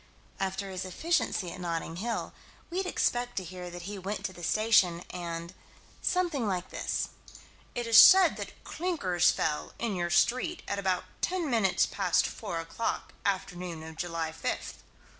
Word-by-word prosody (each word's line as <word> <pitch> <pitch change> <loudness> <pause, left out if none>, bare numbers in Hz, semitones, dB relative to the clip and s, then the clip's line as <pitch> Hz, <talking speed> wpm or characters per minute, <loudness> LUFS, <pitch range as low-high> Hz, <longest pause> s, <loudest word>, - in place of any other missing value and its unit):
After 195 0 -2
his 185 0 -4
efficiency 190 - 0
at - - -8
Notting 165 -1 -3
Hill, 230 +5 -3 0.4
we'd 370 +2 -1
expect 245 -7 0
to 190 - -2
hear 180 0 -7
that 175 0 -8
he 200 +2 -5
went 195 +3 -4
to 185 - -3
the 175 - -11
station, 185 -3 +3
and 170 -1 -5 0.5
something 340 -10 +1
like 185 -2 -2
this: - - -2 0.7
"It 240 -1 -2
is 230 -1 +8
said 380 -2 +9
that - - -8
clinkers 300 - +1
fell, 150 -1 -1
in 230 -3 -1
your 175 -1 -1
street, 255 - +2
at 200 - -1
about 190 -2 0 0.2
ten 360 -3 0
minutes 220 -8 +3
past - - +2
four 175 -7 -4
o'clock, 165 +7 -3
afternoon 180 -4 -3
of 160 0 -9
July 165 -1 -3
fifth. 160 0 -4
190 Hz, 160 wpm, -30 LUFS, 175-235 Hz, 0.7 s, said